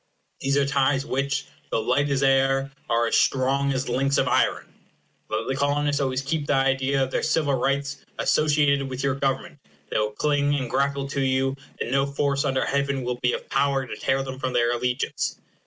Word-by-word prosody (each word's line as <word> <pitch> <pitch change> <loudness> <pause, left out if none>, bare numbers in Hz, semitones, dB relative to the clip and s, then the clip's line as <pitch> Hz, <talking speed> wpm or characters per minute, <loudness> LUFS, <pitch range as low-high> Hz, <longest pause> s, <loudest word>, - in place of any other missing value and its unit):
These 135 +1 0
are 140 - +3
ties 135 0 +1
which, 140 0 -1 0.2
though - - 0
light 145 0 +1
as 140 -1 +1
air, 135 0 +2 0.2
are 115 0 +2
as 115 - +1
strong 135 +1 +2
as 130 0 -2
links 135 +1 +1
of - - +2
iron. - - +1 0.6
Let - - -2
the 135 - -1
Colonists 145 +1 +1
always 130 0 -1
keep 145 +1 -2
the 145 - +2
idea 135 0 +2
of 130 - -3
their - - 0
civil 155 -2 +1
rights 140 +2 0 0.2
associated 145 -3 +2
with 130 +1 -4
your 135 -1 +2
government, 135 -1 -2 0.3
they - - +1
will 105 0 +1
cling 145 +3 +1
and 130 -4 -3
grapple 140 0 0
to 140 - -2
you, 135 0 +1 0.2
and 120 - -3
no 135 +1 +2
force 140 0 0
under 135 -1 +1
heaven 140 -1 0
will 125 0 -3
be 125 - +2
of - - -5
power 135 -1 +1
to 120 - -6
tear 135 0 0
them 130 -1 -7
from 130 -2 -2
their 120 -1 +2
allegiance. 125 +1 -2
135 Hz, 200 wpm, -24 LUFS, 130-140 Hz, 0.6 s, are